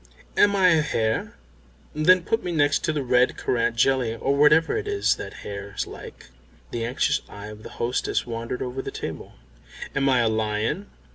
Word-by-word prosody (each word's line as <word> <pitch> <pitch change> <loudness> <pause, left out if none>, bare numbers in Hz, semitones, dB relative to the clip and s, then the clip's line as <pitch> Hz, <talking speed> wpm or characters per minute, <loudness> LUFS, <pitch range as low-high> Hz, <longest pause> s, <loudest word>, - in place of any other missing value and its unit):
"Am 205 0 +4
I 190 -2 +5
a 160 -2 +4
hare? 110 -7 -1 0.6
Then 180 +4 +4
put 225 +5 -1
me 180 - -3
next 145 -3 +2
to 165 - +1
the 150 -3 -2
red 125 0 +2
currant 115 -1 0
jelly, 125 -2 +2
or 135 +4 0
whatever 150 +3 +4
it 430 -1 -3
is 410 -1 +1
that - - -8
hares 100 0 -5
like." - - -11 0.4
The 115 - -3
anxious 140 +5 0
eye 105 +1 -9
of 105 0 -11
the - - -9
hostess 120 +2 -1
wandered 115 +1 -4
over 130 +1 -4
the - - -6
table. - - -7 0.6
"Am 135 0 +2
I 130 -2 +4
a 115 - +2
lion?" 110 - -1
130 Hz, 185 wpm, -24 LUFS, 115-155 Hz, 0.6 s, I